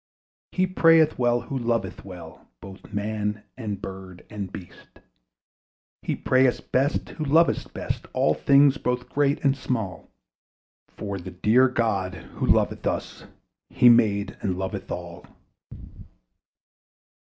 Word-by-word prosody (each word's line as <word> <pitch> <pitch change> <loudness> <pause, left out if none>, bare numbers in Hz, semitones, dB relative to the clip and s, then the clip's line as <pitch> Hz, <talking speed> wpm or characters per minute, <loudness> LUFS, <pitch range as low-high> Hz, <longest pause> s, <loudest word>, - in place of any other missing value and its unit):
He 185 - +1
prayeth 165 -5 +4
well, 120 -1 +2
who 140 - -7
loveth 115 -5 -2
well 90 -4 -11
Both 95 - -12
man 105 0 -3
and 105 -6 -5
bird 95 -2 -9
and 100 -3 -5
beast. 90 -4 -12 1.0
He - - -2
prayeth 130 -1 +1
best, 135 +3 +1
who 155 - -6
loveth 160 +3 +2
best - - -5
All 75 - +2
things 140 - +4
both 125 -1 -2
great 145 0 +1
and 135 0 +4
small; 115 -8 -4 0.8
For 100 -2 -6
the 85 - -8
dear 115 +8 +3
God 100 -7 -1
who - - -6
loveth - - +2
us - - -4 0.4
He 125 - +5
made 105 -3 +3
and 90 -2 -2
loveth 95 0 -5
all. - - -7
115 Hz, 125 wpm, -25 LUFS, 95-130 Hz, 1.0 s, He